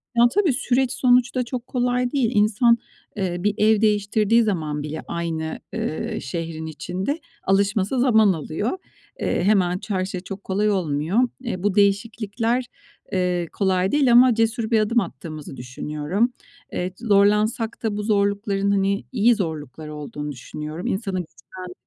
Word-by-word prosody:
Ya, 235 0 +6
tabii 370 -9 +3
süreç 255 0 +1
sonuçta 250 0 +3
çok 245 0 -5
kolay 245 0 0
değil. 255 -5 +1
İnsan, 225 +3 +4 0.4
eee, 185 -3 -1
bir 205 +3 +1
ev 215 0 +4
değiştirdiği 210 +2 +3
zaman 155 -8 -2
bile 155 +1 -5
aynı, 165 -2 -3 0.2
ııı, 155 - -3
şehrin 160 +3 -5
içinde 185 - -3 0.2
alışması 200 +4 +1
zaman 220 -6 +5
alıyor. 165 - -3 0.4
Eee, - - 0
hemen 185 -3 +3
ça 210 -2 -4
her 185 0 0
şey 185 -2 -5
çok 195 +1 -8
kolay 205 +2 0
olmuyor. 170 +1 0 0.2
Eee, 190 -7 -4
bu 205 -2 +1
değişiklikler, 215 +4 +1 0.5
eee, 180 -3 0
kolay 190 -1 +1
değil 280 -4 +3
ama 245 0 +7
cesur 225 0 0
bir 220 - +4
adım 230 +3 +2
attığımızı 155 -9 -7
düşünüyorum. 150 - -2 0.4
Eee, 180 +1 -2
zorlansak 215 +2 +2
da 210 -2 -1
bu 210 - -3
zorlukların, 200 -1 +1
hani, 200 0 +1
iyi 235 0 +4
zorluklar 155 - -5
olduğunu 150 0 -6
düşünüyorum. 150 +5 -6
İnsanı 195 -2 -2
güçlendiren 180 +1 -9
200 Hz, 145 wpm, -23 LUFS, 175-230 Hz, 0.5 s, ama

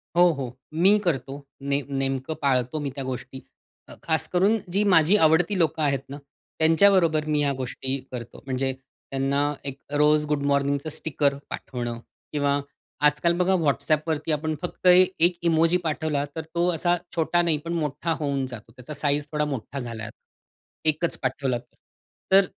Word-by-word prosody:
हो, 175 0 +6
हो. 130 -4 -6 0.2
मी 190 +6 +5
करतो 140 -2 -2 0.3
ने 140 +1 +1
नेमकं 135 +1 -2
पाळतो 130 +1 +1
मी 145 -1 -3
त्या 135 - -4
गोष्टी. 130 0 -6 0.6
खास 160 -1 0
करून 195 +5 +4 0.2
जी 200 +2 +3
माझी 165 +4 +5
आवडती 165 +5 +3
लोकं 160 -1 +1
आहेत 140 -3 +2
ना, 140 - -6 0.4
त्यांच्याबरोबर 165 -1 +4
मी 150 -1 +1
ह्या 145 -1 +2
गोष्टी 130 +1 -2
करतो. 120 -2 -8
म्हणजे 135 0 -1
त्यांना 135 +2 -2
एक 140 -1 -5 0.2
रोज 150 0 +4
गुड 145 -1 0
मॉर्निंगचं 140 +1 0
स्टिकर 145 -2 0 0.2
पाठवणं 120 -2 -5 0.3
किंवा 145 -1 +1 0.5
आजकाल 150 +4 +1
बघा 185 +1 +2
WhatsAppवरती 155 +2 0
आपण 155 +1 -1
फक्त 180 +1 -3
1 180 -1 +5
इमोजी 165 +1 +4
पाठवला, 155 -2 -1
तर 160 - -2
तो 175 +1 +2
असा 175 +2 +1 0.2
छोटा 170 +1 +2
नाही, 165 -3 +2
पण 170 - -3
मोठा 155 0 -2
होऊन 140 -3 -1
जातो, 115 -3 -10
त्याचा 130 +4 -9
साइज 145 0 0
थोडा 150 0 0
मोठा 140 -1 -5
झालाय 115 -3 -6
आता. 110 - -12 0.7
1 155 +2 -1
पाठवला 130 -1 -1
तर 120 - -20 0.7
तर 195 0 +7
150 Hz, 155 wpm, -25 LUFS, 135-165 Hz, 0.7 s, तर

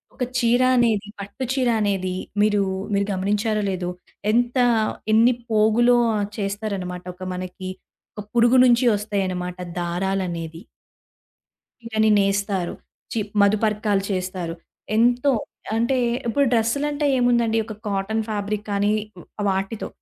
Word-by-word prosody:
ఒక 255 - -2 0.2
చీర 245 +1 +3 0.2
అనేది 220 -4 +2
పట్టు 200 +6 -6
చీర 255 -3 +1
అనేది 190 -3 -1 0.3
మీరు, 205 -1 +3 0.3
మీరు 200 0 +2
గమనించారో 210 +3 0
లేదో 180 -2 -2 0.4
ఎంత 240 +2 +1 0.6
ఎన్ని 230 +3 +5 0.2
పోగులో 225 +3 +4 0.4
చేస్తారన్నమాట. 195 -3 -3
ఒక 185 - -10
మనకి 185 +1 -6 0.5
ఒక - - -4
పురుగు 240 +2 +5
నుంచి 245 0 +4
ఒస్తాయన్నమాట 185 -3 -3 0.2
దారాలనేవి. 175 -2 -2 1.2
చీరని 220 -2 +1
నేస్తారు. 195 -2 0 0.4
చి 225 - -1 0.2
మధుపర్కాలు 210 -1 +2
చేస్తారు. 185 -2 -3 0.4
ఎంతో 245 +4 +3 0.4
అంటే 235 +3 +1 0.3
ఇప్పుడు 275 +5 +2
డ్రెస్సులంటే 285 +6 +1
ఏముందండి 235 -2 +2
ఒక 220 - -7
కాటన్ 205 +3 -1
ఫాబ్రిక్ 210 0 -3
కానీ 200 +1 +1 0.6
వాటితో. 195 +3 -2
210 Hz, 110 wpm, -23 LUFS, 195-235 Hz, 1.2 s, ఎన్ని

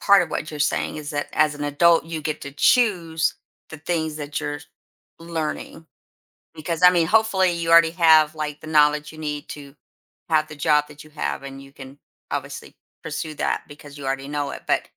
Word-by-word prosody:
part 200 -1 +5
of - - -6
what 155 - -4
you're 150 -1 -7
saying 150 - 0
is 150 -1 -6
that 145 -1 -3
as 150 -1 +2
an 145 0 -5
adult, 165 +4 +3
you 165 -1 -5
get 155 0 -4
to 140 - -7
choose 170 - +2 0.4
the 160 - -9
things 160 -1 -2
that 145 -1 -4
you're 145 0 -4
j 145 - -15 0.6
learning, 160 -1 -5 0.7
because, 165 +2 -4
I 180 - +9
mean, 170 -2 +2
hopefully 200 -3 +3
you 170 -1 -2
already 165 0 +7
have, 160 -3 +5
like, 150 -1 -5
the 155 - -10
knowledge 150 0 +3
you 155 - -14
need 150 -1 -5
to 140 -1 -10 0.5
have 155 -1 +2
the 150 - -10
job 150 0 +2
that 150 0 -13
you 155 - -17
have, 70 - -3
and 135 0 -8
you 135 0 -15
can 135 0 -12 0.3
obviously - - -6 0.3
pursue 155 +1 -5
that - - -1
because 145 0 -13
you 140 - -8
already 135 0 -3
know 145 -1 -3
it. - - -8
But - - +2
155 Hz, 205 wpm, -22 LUFS, 145-165 Hz, 0.7 s, I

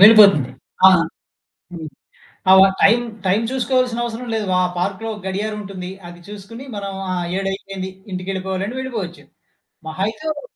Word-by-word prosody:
వెళ్ళిపోతుంది. 200 - +8 0.4
ఆహ్, 185 -3 +7 0.7
హ్మ్. 160 -2 -6 0.6
ఆ - - +10
వ - - +10 0.2
టైమ్, 235 +4 +5 0.2
టైమ్ 200 +5 +3
చూసుకోవాల్సిన 255 -2 +1
అవసరం 240 +1 -4
లేదు. 215 -2 -1
ఆ - - +3
పార్క్‌లో 200 +5 -2
గడియారం 210 +3 -2
ఉంటుంది. 185 -2 -7 0.2
అది 175 0 -12
చూసుకొని. 210 +5 -9
మనం 200 -1 -4 0.2
ఆ - - 0 0.2
7 195 0 -1
అయిపోయింది. 195 -1 -6 0.2
ఇంటికెళ్ళిపోవాలి 190 +1 -3
అంటే 245 +4 -5
వెళ్ళిపోవచ్చు. 200 - -5 0.7
మహా 170 +5 -3
అయితే, 220 +7 -6
ఓ 295 - -8
200 Hz, 150 wpm, -20 LUFS, 185-225 Hz, 0.7 s, ఆ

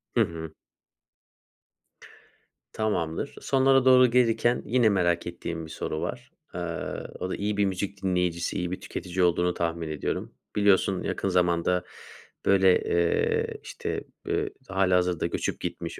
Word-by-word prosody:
Hı - - +5
hı. 80 -1 -3 2.2
Tamamdır. 95 - -2
Sonlara 135 -1 +3
doğru 130 -1 +7
gelirken 120 0 +3
yine 120 -2 +3
merak 85 -4 +1
ettiğim 85 -1 -5
bir 80 - -11
soru 80 - -4
var. 125 +4 -5 0.2
Eee, - - -3 0.6
o 95 - -3
da - - -2
iyi 105 0 -2
bir 100 - +3
müzik 95 +1 -3
dinleyicisi, 90 -2 0
iyi 90 0 -2
bir 90 - -4
tüketici 90 +1 -3
olduğunu 90 0 +2
tahmin 85 -1 -2
ediyorum. 75 - -3 0.2
Biliyorsun, 100 -2 +3
yakın 100 - -2
zamanda 90 0 +2 0.6
böyle, 95 -1 +5
eee, 85 0 +1
işte, - - -4 0.2
eee, - - 0 0.2
hâlihazırda 90 -3 +2
göçüp - - -2
gitmiş, - - -5
90 Hz, 130 wpm, -27 LUFS, 85-105 Hz, 2.2 s, doğru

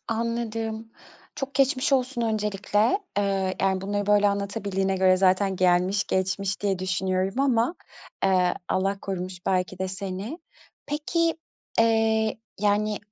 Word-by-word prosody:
Anladım. 225 -1 -2 0.5
Çok 275 -1 -5
geçmiş 270 0 +2
olsun 255 -2 +1
öncelikle. 210 - +1 0.2
Eee, 195 -2 0
yani, 190 -1 +1
bunları, 205 +1 -2
böyle, 205 0 +4
anlatabildiğine 200 -1 -1
göre 185 0 +4
zaten 190 +1 +2
gelmiş 185 +3 +2
geçmiş 190 +1 -1
diye 195 -3 0
düşünüyorum 185 +3 -1
ama, 255 +1 +2 0.5
eee, 185 -2 +3
Allah 195 +1 0
korumuş 185 -1 -5
belki 185 0 0
de 190 - -2
seni. 195 - -5 0.5
Peki, 325 +3 0 0.5
eee, 225 -1 +2 0.2
yani, 210 0 +1
200 Hz, 120 wpm, -25 LUFS, 190-225 Hz, 0.5 s, böyle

